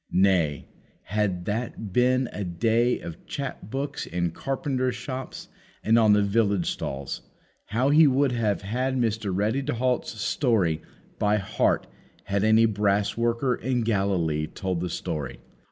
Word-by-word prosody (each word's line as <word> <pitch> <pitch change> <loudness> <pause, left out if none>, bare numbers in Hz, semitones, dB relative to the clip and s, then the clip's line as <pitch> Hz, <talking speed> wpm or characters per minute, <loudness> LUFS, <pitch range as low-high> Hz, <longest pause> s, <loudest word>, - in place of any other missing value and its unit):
Nay, 90 -6 +2 0.4
had 95 -3 -1
that 110 -2 -3
been 125 +2 +3
a 105 - -3
day 115 +7 +1
of 85 - -8
chap 135 -8 -5
books 140 +3 -3
in 85 -1 -1
carpenters' 130 - -2
shops 130 +1 -6 0.4
and 115 +2 +4
on 110 -2 +5
the 105 0 +4
village 100 -3 +1
stalls, 70 0 -4 0.4
how 125 +6 +1
He 155 +1 +7
would 135 0 +3
have 110 -5 0
had 130 +6 -1
Mr. 110 -4 0
Ready 105 +8 0
to 140 -1 -2
halt's 125 -2 -1
story 95 - +1 0.4
by 105 0 +3
heart 100 -2 +1 0.4
had 100 0 -1
any 110 +1 +5
brass 105 -1 +1
worker 115 +2 +1
in 125 +1 -1
Galilee 95 -8 0
told 95 +1 -3
the 90 - -2
history! 75 -5 -4
110 Hz, 145 wpm, -26 LUFS, 95-125 Hz, 0.4 s, He